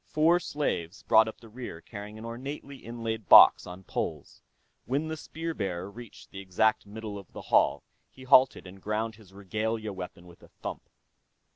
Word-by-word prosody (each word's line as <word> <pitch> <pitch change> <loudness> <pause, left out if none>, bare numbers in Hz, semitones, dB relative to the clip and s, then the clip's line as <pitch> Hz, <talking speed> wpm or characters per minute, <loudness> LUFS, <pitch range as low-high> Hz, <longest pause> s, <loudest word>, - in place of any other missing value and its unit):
Four 160 +3 +3
slaves 105 - -3
brought 110 0 +5
up 110 - -8
the 115 - -13
rear 115 -7 -8
carrying 105 +3 -9
an 110 - -9
ornately 135 +4 -7
inlaid 115 -4 -5
box - - +9
on 90 +1 -9
poles. - - -5 0.4
When 145 +5 -1
the 160 - -3
spear 165 +1 -5
bearer 95 - -4
reached 115 0 -12
the 95 - -8
exact 100 +3 +1
middle 105 -1 -7
of 95 - -15
the - - -7
hall, 70 +1 +4 0.3
he 130 - -15
halted 130 -3 +5
and 95 +1 -12
grounded 110 +2 -2
his 100 -4 -17
regalia 110 +2 -3
weapon 90 -1 -8
with 85 -1 -16
a - - -16
thump. - - -8
110 Hz, 175 wpm, -28 LUFS, 95-120 Hz, 0.4 s, box